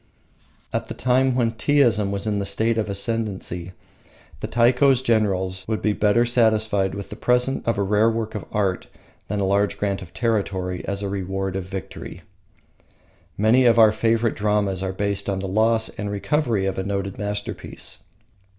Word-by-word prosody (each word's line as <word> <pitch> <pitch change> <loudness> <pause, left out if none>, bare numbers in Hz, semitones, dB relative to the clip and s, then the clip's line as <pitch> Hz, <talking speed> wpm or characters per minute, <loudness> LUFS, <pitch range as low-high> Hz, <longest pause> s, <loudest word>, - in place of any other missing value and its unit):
At - - -2
the - - -6
time 130 +1 +2
when 120 -3 +2
Teaism 115 -4 +2
was 100 +1 -3
in 105 -2 0
the 110 +3 0
ascendency 100 -4 -3 0.7
the - - -4
Taiko's 125 +2 +3
generals 95 -5 0
would 110 -1 -1
be 105 - +1
better 105 +3 +3
satisfied 110 -5 +2
with 100 0 -7
the - - -5
present 125 +1 +1
of 115 - +1
a 100 - +1
rare 105 +3 +3
work 110 -1 -3
of 105 - -5
art 100 -3 -1 0.4
than 105 +1 -2
a - - 0
large 100 +1 +1
grant 100 -1 -1
of 90 - -10
territory 95 -6 -1
as 100 +1 -3
a - - -1
reward 95 0 -3
of 95 -2 -3
victory. 95 -2 -8 1.1
Many 115 +5 +4
of 115 -1 +5
our 110 -2 +7
favourite 115 +1 +1
dramas 105 -3 0
are 95 -1 -2
based 100 +1 -2
on 100 - -1
the 95 0 -4
loss 110 +3 +2
and 105 -1 -5
recovery 110 0 0
of 95 0 -2
a - - -1
noted 100 -1 -3
masterpiece. 105 0 -5
105 Hz, 170 wpm, -23 LUFS, 95-115 Hz, 1.1 s, our